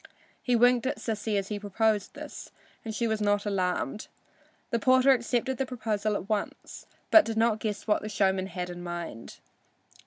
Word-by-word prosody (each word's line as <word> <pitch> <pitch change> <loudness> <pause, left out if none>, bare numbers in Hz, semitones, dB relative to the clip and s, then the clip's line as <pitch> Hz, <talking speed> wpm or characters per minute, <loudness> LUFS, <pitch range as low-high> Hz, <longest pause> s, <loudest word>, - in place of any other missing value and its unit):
He 250 - +1
winked 245 +1 +4
at - - -1
Sissy 215 -1 -2
as 195 0 -2
he 210 -1 -3
proposed 205 0 0
this, - - -8 0.3
and 220 -2 -5
she 235 +1 0
was 220 -1 -1
not 205 0 +1
alarmed. 185 -3 -1 0.6
The 235 - +1
porter 260 +2 +5
accepted 245 +1 0
the 270 - +1
proposal 215 -4 -1
at 195 - -4
once, 210 -2 -4 0.2
but 325 -5 +8
he - - -1
did - - -7
not 225 -1 +2
guess 215 -2 -3
what 210 - +2
the 215 - -5
showman 190 -2 +1
had 180 -1 -5
in 175 0 -8
mind. 175 -9 -6
215 Hz, 185 wpm, -28 LUFS, 200-235 Hz, 0.6 s, but